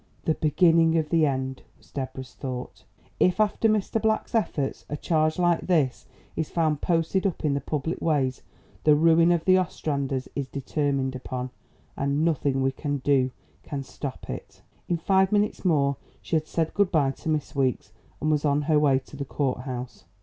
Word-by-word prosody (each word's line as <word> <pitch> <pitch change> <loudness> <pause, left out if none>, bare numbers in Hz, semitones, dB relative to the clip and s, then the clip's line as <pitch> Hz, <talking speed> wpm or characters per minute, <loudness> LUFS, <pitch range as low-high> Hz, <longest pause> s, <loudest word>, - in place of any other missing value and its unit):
"The 160 - +3
beginning 165 +1 +3
of 155 -2 0
the 160 -2 +3
end!" 130 -1 -2 0.2
was - - -24
Deborah's 130 -1 -6
thought. 125 -2 -6 0.3
"If 180 +3 +3
after 215 +1 +2
Mr. 215 +1 0
Black's 220 +1 0
efforts, 155 -11 -1
a 150 - -3
charge 155 0 +1
like 175 -1 +1
this 150 -9 +1 0.3
is 160 - -2
found 155 -3 0
posted 175 +3 +1
up 180 - -4
in 145 - +2
the 140 - -1
public 150 +4 -3
ways, 135 -5 +1 0.4
the 150 -1 +6
ruin 165 +2 +5
of 170 -2 +1
the 185 0 +6
Ostranders 140 -6 -2
is 140 -2 -2
determined 140 -1 -1
upon, 130 0 -5 0.4
and 140 +3 0
nothing 140 -4 +1
we 135 - +2
can 145 +1 -3
do 130 -1 +2 0.3
can 140 -2 -5
stop 135 0 -7
it." - - -8 0.3
In 175 - +2
five 190 +3 +2
minutes 210 0 +1
more 140 -6 +2 0.2
she - - -3
had 155 -1 0
said 160 -1 -1
good 200 -2 +2
bye 145 -6 +3
to 160 - -6
Miss 155 -2 -1
Weeks 130 -6 0 0.3
and 155 - +1
was 150 -1 +1
on 145 0 +2
her 155 0 +3
way 140 -3 +4
to 135 +2 -9
the 140 - -4
courthouse. 130 -2 -3
150 Hz, 180 wpm, -26 LUFS, 135-165 Hz, 0.4 s, the